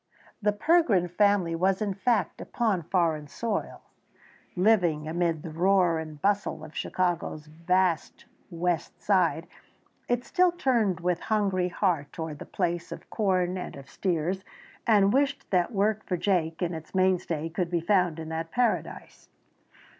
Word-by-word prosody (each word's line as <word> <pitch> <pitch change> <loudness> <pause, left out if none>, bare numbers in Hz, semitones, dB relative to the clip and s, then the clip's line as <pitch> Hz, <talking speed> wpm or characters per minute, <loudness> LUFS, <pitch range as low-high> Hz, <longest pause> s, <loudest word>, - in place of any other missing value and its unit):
The 210 0 +3
Pergrin 210 - +3
family 200 -3 +2
was 185 +3 +1
in 210 -2 -1
fact 205 -2 0
upon 215 -7 0
foreign 165 -3 0
soil. 220 +7 -4 0.7
Living 180 -6 +2
amid 165 -1 -1
the 165 - -6
roar 175 0 +3
and 155 -2 -8
bustle 200 -2 0
of 155 - -14
Chicago's 175 -4 -2
vast 170 +1 0 0.2
west 170 -1 -2
side, 170 -5 +2 0.6
it 245 0 0
still 360 -1 +3
turned 235 - +1
with 175 0 0
hungry 195 -4 0
heart 170 -7 0
toward 160 -3 -6
the - - -7
place 175 -2 -2
of - - -9
corn 185 -3 0
and - - -6
of 140 -1 -11
steers, 180 +1 -1 0.4
and 205 -3 +5
wished 280 +1 +1
that 180 +2 +2
work 215 0 +1
for 180 - -1
Jake, 170 -3 0
its 165 0 -5
mainstay, 180 -4 +1
could 175 +1 -2
be 175 -1 0
found 180 -2 +2
in 160 -1 -6
that 160 0 -4
paradise. 245 +3 -2
180 Hz, 145 wpm, -27 LUFS, 165-205 Hz, 0.7 s, and